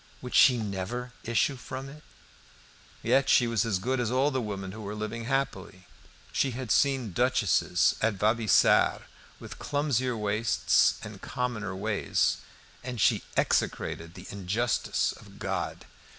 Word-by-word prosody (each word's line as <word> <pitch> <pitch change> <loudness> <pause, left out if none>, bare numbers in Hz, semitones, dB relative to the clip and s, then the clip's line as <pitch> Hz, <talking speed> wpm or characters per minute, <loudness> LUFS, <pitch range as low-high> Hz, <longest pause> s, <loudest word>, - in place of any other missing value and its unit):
Would 125 - -7
she 130 -4 +6
never 110 +4 -4
issue 120 +4 +1
from 130 +1 -7
it? 150 +2 -12 1.0
Yet 135 0 +3
she 120 - +5
was 115 -3 +1
as 100 -4 +1
good 130 +7 -1
as 120 -3 0
all 130 +4 +2
the 130 -2 -1
women 100 -4 -5
who 110 +2 -9
were 105 0 -5
living 110 +2 -4
happily. 135 -8 -3 0.5
She 135 - +1
had 130 -5 -4
seen 135 -6 +2
duchesses 120 -2 +2
at 110 -1 +1
Vaubyessard 110 +2 +3 0.4
with - - -10
clumsier 130 -4 0
waists 105 +1 +2
and - - -9
commoner 110 -6 -3
ways, 105 +1 0 0.5
and 125 -2 -5
she - - +3 0.2
execrated 85 +1 0
the 90 - -10
injustice 100 +5 0
of - - -14
God. - - -4
115 Hz, 140 wpm, -28 LUFS, 105-130 Hz, 1.0 s, she